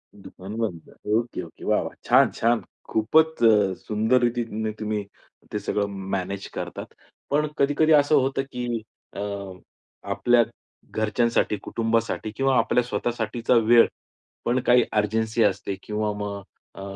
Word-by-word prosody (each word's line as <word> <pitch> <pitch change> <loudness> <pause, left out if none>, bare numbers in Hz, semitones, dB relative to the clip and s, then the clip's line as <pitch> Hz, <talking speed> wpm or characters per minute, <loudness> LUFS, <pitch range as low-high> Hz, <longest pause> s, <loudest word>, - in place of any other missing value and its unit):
दुकान 95 +1 -10
बंद. 100 -8 -4 0.2
Okay, 115 -3 -1
okay. 80 - -13
वाह, - - +2
वाह! - - -6
छान, - - +5
छान. 115 0 +1 0.3
खूपच 155 +5 +2
अ, 105 -4 +5
सुंदर 110 +4 +1
रीतीने 115 -2 -1
तुम्ही 105 -1 -2 0.5
ते 105 - -1
सगळं 100 0 -1 0.3
मॅनेज 95 +1 -4
करतात. - - -6 0.4
पण 150 +1 +2
कधी-कधी 145 +3 +3
असं 145 +1 +5
होतं 135 0 +2
की 120 -2 -3 0.3
अ, - - -5 0.9
आपल्या 120 -1 +4 0.5
घरच्यांसाठी, 110 0 +1
कुटुंबासाठी 115 -1 -1
किंवा 135 0 +2
आपल्या 125 - +2
स्वतःसाठीचा 120 -1 -1
वेळ 115 +1 +6 0.6
पण 125 +2 +2
काही 125 -1 +6
अर्जन्सी 110 +2 +1
असते 100 -1 0
किंवा 105 0 -2
मग 100 -1 -4 0.3
अ, 95 - -9
115 Hz, 130 wpm, -24 LUFS, 105-120 Hz, 0.9 s, वेळ